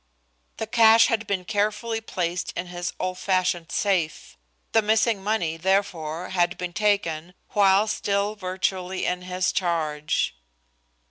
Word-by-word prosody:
The 220 - -3
cash 225 0 +6
had 225 -1 -1
been 190 -3 -2
carefully 215 +3 -1
placed 180 -5 -3
in 180 - -3
his 175 0 -4
old 185 0 -3
fashioned 180 -3 0
safe; 180 -6 -1 0.4
the 225 - +4
missing 220 -1 +2
money, 180 -6 0
therefore, 180 -2 -1
had 175 -1 +1
been 180 -1 -5
taken 180 -5 0
while 200 0 +4
still 205 -1 -1
virtually 185 -1 -2
in 180 0 -1
his 180 0 -1
charge. 155 -4 -1
185 Hz, 130 wpm, -25 LUFS, 175-210 Hz, 0.4 s, cash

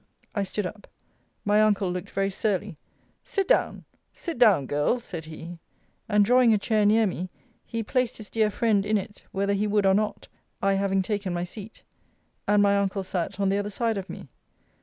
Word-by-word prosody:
I 205 - 0
stood 200 +1 -2
up. 205 +3 -7 0.6
My 205 +1 +4
uncle 205 -3 +2
looked 180 +2 -5
very 195 0 -1
surly. 200 -2 -1 0.5
Sit 390 -1 -1
down! - - +1 0.3
Sit 335 -8 -6
down, 205 - +5
Girl, 145 - +1
said 170 -8 -7
he. 165 +2 -9 0.5
And 210 -1 +4
drawing 245 +1 +5
a - - +3
chair 210 0 +2
near 220 +1 +4
me, 185 -1 -3 0.4
he 230 -1 -3
placed 250 +2 0
his 215 - -9
dear 220 -2 +1
friend 210 -2 +2
in 215 +1 +1
it, 205 +1 -7
whether 200 +1 0
he 205 +1 0
would 205 -1 +2
or 190 - +5
not, 210 +2 -1 0.3
I 195 0 +2
having 195 -1 +1
taken 200 -3 -2
my 175 - -1
seat. 205 +4 -9 0.6
And 205 0 +4
my 200 0 +4
uncle 195 0 -1
sat 185 0 -3
on 195 -1 +2
the 200 +1 +1
other 205 0 -3
side 225 0 -1
of 190 - -8
me. - - -8
205 Hz, 195 wpm, -26 LUFS, 195-215 Hz, 0.6 s, down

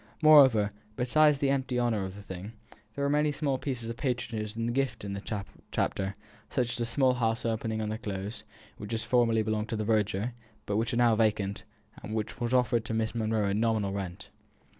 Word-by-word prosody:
Moreover, 130 -9 +7 0.2
besides 150 +5 +4
the 135 0 +1
empty 130 -2 0
honour 115 -4 +1
of 95 0 -7
the 100 - -10
thing, 95 +3 -8 0.4
there 140 - -2
were 140 - +2
many 150 0 +3
small 140 -2 -1
pieces 125 -5 -3
of 115 0 -5
patronage 115 -5 -3
in 115 - -1
the 120 - 0
gift 130 -4 -1
of 100 -1 -4
the 100 0 -4 0.2
Chapter 95 0 -1 0.3
such 120 -2 0
as - - -3
a 120 - 0
small 130 +2 +3
house 115 -2 0
opening 110 -1 -1
on 105 - -2
to - - -2
the - - -3
Close, 105 +1 -5 0.3
which 105 +2 -6
had 110 - 0
formerly 115 -3 +2
belonged 110 0 -1
to - - -1
the 110 -1 -2
verger, 105 +1 +1 0.3
but 100 - -1
which 115 +2 0
was - - 0
now 120 -1 +5
vacant, 105 -3 0 0.4
and 110 - -5
was 110 -1 -2 0.2
offered 125 -2 +2
to 110 - -2
Miss 110 0 0
Monro 110 -2 0
at 100 - +1
a - - 0
nominal 110 -2 +1
rent. 95 -3 -6
115 Hz, 215 wpm, -29 LUFS, 105-125 Hz, 0.4 s, Moreover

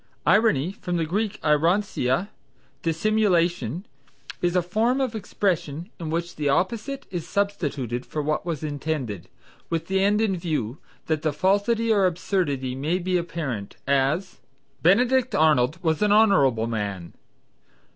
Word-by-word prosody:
Irony 190 - +3
(from 180 -3 -4
the 165 - 0
Greek 205 +5 -2
eironcia, 165 0 +1 0.5
dissimulation) 175 - +1 0.6
is 175 0 +1
a 180 - +3
form 225 +9 +1
of 260 -4 -1
expression 175 -4 -2
in 165 -2 -4
which 170 +2 -3
the 145 -2 0
opposite 220 - -1
is 175 -3 -4
substituted 145 - -1
for 155 - -5
what 155 +1 0
is 160 -4 -3
intended, 145 - -3 0.4
with 165 -1 -1
the 190 0 +1
end 205 +1 +3
in 215 -4 +1
view, 155 -8 -3 0.3
that 155 -2 -1
the 155 - 0
falsity 205 - +2
or 195 -3 +4
absurdity 165 -8 -1
may 150 +7 -1
be 185 0 -1
apparent; 160 - -3
as, 140 +7 +1 0.4
"Benedict 245 +6 +3
Arnold 155 -4 +3
was 160 -2 +1
an 210 -1 +3
honorable 185 - +4
man." 100 -6 -4
170 Hz, 135 wpm, -24 LUFS, 145-200 Hz, 0.6 s, or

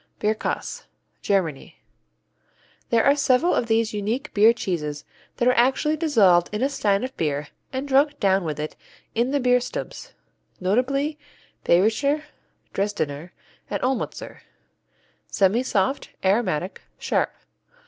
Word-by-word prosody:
Bierkäse 215 +1 -2 0.4
Germany 170 -8 -1 1.1
There 230 -1 +3
are 280 - +5
several 280 +4 +3
of 235 - 0
these 225 -1 +1
unique 225 +8 -3
beer 215 +2 +6
cheeses 155 -10 -3 0.3
that 245 - +1
are 250 - +5
actually 265 +6 +2
dissolved 210 - +4
in 210 +3 -2
a 275 - +2
stein 205 -7 +1
of 260 +1 -5
beer 150 -2 -2 0.2
and 265 +2 -4
drunk 285 +2 +3
down 195 -2 +2
with 155 -3 -4
it 150 +1 -4 0.4
in 235 +3 +1
the 285 +1 +1
Bierstubes, 250 - -1 0.5
notably 275 +10 0 0.5
Bayrischer, 225 - +2 0.5
Dresdener, 175 -6 -2 0.4
and - - -2
Olmützer. 260 0 -3 0.9
Semisoft; 205 +3 +1 0.2
aromatic; 190 -3 0 0.2
sharp. - - 0
225 Hz, 115 wpm, -24 LUFS, 190-270 Hz, 1.1 s, beer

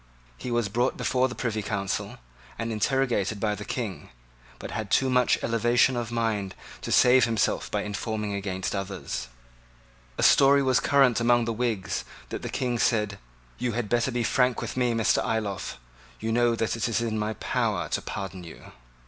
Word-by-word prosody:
He 125 - -7
was 120 -2 +1
brought 120 +5 0
before 130 0 +1
the 125 - -7
Privy 110 -3 -2
Council, 100 -2 -3 0.4
and 115 0 -3
interrogated 110 -2 0
by 105 0 0
the 105 0 -6
King, 110 -4 -5 0.5
but - - -8
had 110 -2 -4
too 130 +4 +3
much 125 -1 +3
elevation 120 +3 +3
of 120 -1 -3
mind 110 -5 -1 0.3
to - - -5
save 125 -1 +6
himself 115 -3 0
by - - -1
informing 105 0 -3
against 95 -1 -3
others. 95 -9 -4 0.9
A - - 0
story 140 0 +6
was 130 -2 +3
current 135 -2 +4
among 120 0 +3
the 115 - -1
Whigs 110 -4 -2 0.3
that - - -5
the - - -5
King 120 -2 -1
said, 105 -4 +1 0.4
"You 120 -1 -1
had 115 -2 -2
better 120 +1 +2
be 120 -1 -1
frank 125 +1 +2
with - - -5
me, 125 -2 +1
Mr. 115 -1 +2
Ayloffe. 105 - -2 0.4
You 110 +1 -2
know 120 0 +3
that 115 0 -1
it 115 0 -1
is 115 0 0
in 110 -2 -1
my 105 +1 -1
power - - -1
to - - -1
pardon 95 -2 -6
you." 85 - -12
115 Hz, 180 wpm, -26 LUFS, 105-120 Hz, 0.9 s, save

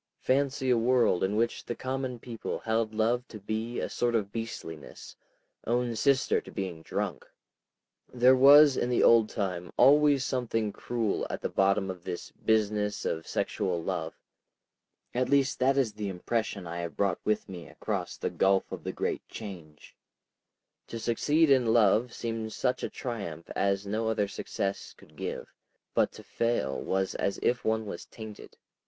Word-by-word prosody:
Fancy 135 0 +1
a 120 - +4
world 120 -5 +3
in 95 +2 0
which 115 +2 0
the 120 - -4
common 130 -1 -3
people 115 -1 -5
held 110 -1 -1
love 115 +3 0
to 110 - -9
be 110 +4 -3
a - - -2
sort 120 -1 0
of 100 -3 0
beastliness, 100 -9 -7 0.5
own 120 0 0
sister 135 +4 +2
to - - -13
being 95 -5 -5
drunk!... - - -4 0.8
There 125 +1 +5
was 140 +2 +8
in 120 - 0
the 125 - +2
old 115 -2 +6
time 90 -5 -3
always 145 -1 +5
something 115 -5 -1
cruel 115 -4 -2
at - - -3
the - - -2
bottom 95 0 +2
of 90 -2 -10
this 85 - -6
business 105 -1 0
of 80 0 -2
sexual 90 -3 -1
love. - - -3 1.0
At 125 +1 0
least 140 -1 +2
that 135 +2 +3
is 125 -6 +1
the 105 -1 -4
impression 100 +1 -2
I 85 +1 -5
have 85 -1 -5
brought 100 -3 +1
with 110 - 0
me 90 -4 -8
across - - -4
the - - -2
gulf 95 0 +2
of - - -6
the - - -3
great - - -3
Change. 85 -8 -10 0.9
To 115 - -6
succeed 145 +7 +2
in 125 -4 +4
love 115 +2 +4
seemed 115 -2 -4
such 125 -1 0
triumph 100 -10 -6
as 100 0 +1
no 110 +3 -1
other 105 -2 +1
success 100 0 -4
could - - -19
give, - - -5 0.4
but - - +2
to - - -11
fail 115 - -1
was 95 0 -1
as 100 - -1
if 120 -2 +1
one 110 0 0
was 100 - -7
tainted.. 110 -2 -10
110 Hz, 165 wpm, -29 LUFS, 100-125 Hz, 1.0 s, was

